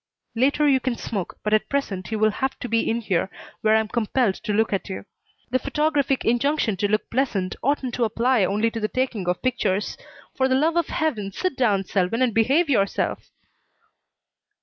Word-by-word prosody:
"Later 280 +5 +2
you 270 -2 +4
can 255 -1 -1
smoke, 200 -5 -5
but 210 - 0
at 215 - +2
present 210 -9 -2
you 220 - 0
will 215 0 +3
have 265 +5 -2
to - - -5
be 230 0 +1
in 230 +1 0
here 190 -4 0 0.3
where 215 0 +4
I'm 220 0 +2
compelled 235 -1 +1
to 210 - -5
look 220 +1 +1
at 195 - -2
you. 190 - -6 0.5
The 255 - +2
photographic 285 -1 0
injunction 240 -1 +1
to 205 - +1
look 215 +1 0
pleasant 225 -8 0
oughtn't 270 -2 0
to 240 - +1
apply 230 +1 +2
only 210 +4 +1
to 225 - -4
the 215 - 0
taking 245 -7 -2
of 180 - -2
pictures. 210 -6 -1 0.3
For 265 - +1
the 260 - +2
love 315 +5 +2
of 340 -1 +1
Heaven, 245 - -1
sit 370 - -2
down, 210 -7 +2
Selwyn, 195 +7 0
and 245 -3 +1
behave 270 +10 +3
yourself!" 200 -8 0
230 Hz, 195 wpm, -23 LUFS, 210-265 Hz, 0.5 s, you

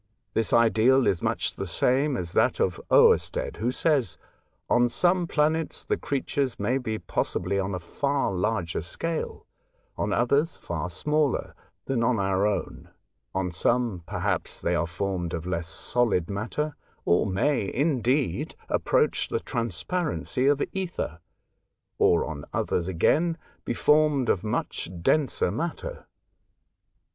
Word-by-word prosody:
This 115 - 0
ideal 115 +3 +4
is 85 - +1
much - - -1
the 95 - -4
same 130 - +2
as 85 -4 -3
that - - +2
of - - 0
Oersted, - - +4
who 115 - 0
says: 135 - +1 0.3
'' - - -45
On 120 0 +3
some 175 +6 +2
planets 155 0 0
the - - +1
creatures 140 -1 -2
may 120 +6 +1
be 110 -4 -3
possibly 95 -1 -1
on 95 0 -2
a - - -3
far 140 +9 -1
larger 90 -3 -1
scale, 160 - -4 0.5
on 105 - 0
others 140 - +2
far 85 0 -4
smaller, 150 - 0 0.3
than 135 -3 0
on 115 0 +2
our 95 0 +1
own; 105 - -3 0.5
on 95 -1 -1
some, 115 +1 0
per - - -4
haps, - - -1
they 85 - -1
are 85 -1 +1
formed 90 -1 -3
of 85 0 -5
less 85 -2 -2
solid 100 0 0
matter, 125 +9 -3 0.3
or 85 - +3
may, 100 +3 0
indeed, 135 - 0
approach - - +1
the - - 0
transparency 125 - -2
of 145 0 +3
ether; 175 - -3 0.8
or, 85 - +4
on 75 -2 -6
others 85 0 -1
again, 160 - +2 0.3
be - - -1
formed 150 -4 +3
of 95 - +1
much 105 -5 -2
denser 140 - +2
matter. 170 - -4
115 Hz, 140 wpm, -26 LUFS, 90-145 Hz, 0.8 s, ideal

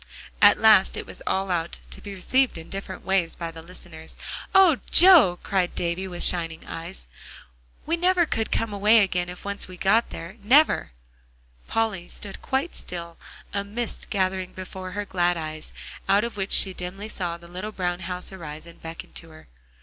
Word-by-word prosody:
At - - +8
last - - +6
it - - -5
was - - -11
all 190 0 0
out, 170 -1 -2
to - - -5
be 205 - -8
received 255 +5 +1
in 165 0 -10
different 195 0 -6
ways 190 -3 +1
by 170 -1 -5
the 165 0 -10
listeners. 165 -2 -11 0.4
"Oh, 370 -8 +6
Joe!" 340 - +8
cried 185 -3 0
Davie 175 +2 -2
with 175 -2 -1
shining 165 -2 0
eyes. 170 +3 -7 0.8
"We 330 +2 0
never 360 0 +3
could 225 -7 -2
come 225 -2 0
away 210 +3 +5
again 180 -2 0
if 180 +2 -10
we - - -3
once 200 - -3
get 195 +5 +1
there, 170 +6 -8
never!" 260 - +4 0.7
Polly 215 -6 -1
stood 200 -2 -8
quite 275 +6 -1
still, 170 -1 -7 0.4
a 200 - -1
mist 225 +4 -5
gathering 185 -3 -1
before 185 0 -8
her 205 +1 -3
glad 175 -2 +1
eyes, 155 -1 -6 0.4
out 200 +2 +4
of 235 -1 -4
which 195 -1 -3
she 190 - +4
dimly 185 +4 -6
saw 175 -5 -3
the 170 0 -15
little 185 +5 -6
brown 180 -3 -2
house 180 +1 -5
arise 155 -4 -8
and 170 0 -14
beckon 165 0 -8
to 165 - -9
her. 155 - -16
185 Hz, 180 wpm, -25 LUFS, 170-210 Hz, 0.8 s, At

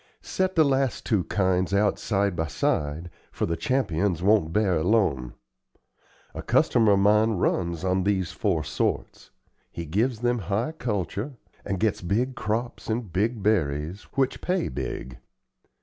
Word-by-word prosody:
Set 185 0 -1
the 160 - +6
last 135 -2 0
two 105 -6 +1
kinds 95 0 +1
out 105 +1 +2
side 100 -3 0
by 80 -1 -1
side, 75 +3 -1 0.2
for - - -2
the 85 - -1
Champions 90 -4 0
won't 100 -5 +3
bear 100 -1 +2
alone. 80 - +1 1.0
A - - -5
customer 110 -3 +3
of - - +4
mine 105 +2 +4
runs 85 -2 -1
on 95 0 +1
these 95 -3 0
four 90 -7 0
sorts. - - -3 0.4
He 85 - -6
gives 110 - 0
them 120 0 +1
high 110 +9 0
culture, 110 - -3 0.3
and 95 -2 -3
gets 110 -1 0
big 115 +9 0
crops 115 +2 -3
and 110 -5 -3
big 105 +3 0
berries, 85 -3 0
which 135 -1 0
pay 180 0 0
big. 65 0 -5
100 Hz, 150 wpm, -26 LUFS, 85-115 Hz, 1.0 s, the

